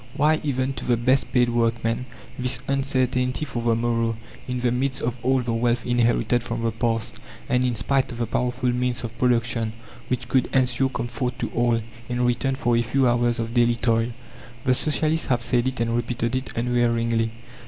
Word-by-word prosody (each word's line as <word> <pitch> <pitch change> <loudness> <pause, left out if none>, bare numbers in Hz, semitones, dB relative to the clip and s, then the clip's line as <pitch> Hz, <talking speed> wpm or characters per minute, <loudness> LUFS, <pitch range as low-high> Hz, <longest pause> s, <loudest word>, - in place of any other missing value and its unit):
Why, 155 +2 +3
even 135 -2 -1
to - - -6
the 120 -1 +2
best 130 +3 +2
paid 125 -1 +3
workman, 115 +1 0 0.3
this 125 0 +2
uncertainty 130 -1 0
for 125 -4 -4
the 115 -1 +2
morrow, 115 -1 0 0.3
in 125 -1 -2
the 120 -1 +2
midst 130 +2 -1
of 120 - 0
all 130 +1 +2
the 115 -1 -2
wealth 120 +1 +1
inherited 120 -1 +2
from 115 -1 -4
the 115 - +1
past, 115 -1 -1 0.3
and 125 0 +2
in 125 -2 0
spite 135 +4 0
of 120 - -7
the 120 - 0
powerful 125 +2 0
means 125 0 -1
of 115 -1 -5
production, 115 -2 +1 0.3
which 125 0 -2
could 130 0 +2
ensure 130 0 +2
comfort 120 0 -3
to - - -3
all, 120 -1 +1 0.3
in 125 0 0
return 125 +2 +1
for 120 -3 +1
a 115 - +3
few 130 +3 +2
hours 120 0 +2
of 115 0 -3
daily 120 -1 +3
toil? 115 0 +1 0.5
The 130 - +4
Socialists 155 +4 +1
have 125 -3 +1
said 120 0 +1
it 130 -1 -3
and 115 0 0
repeated 120 0 -1
it 130 +1 -3
unwearyingly. 115 -1 +1
120 Hz, 190 wpm, -24 LUFS, 115-125 Hz, 0.5 s, The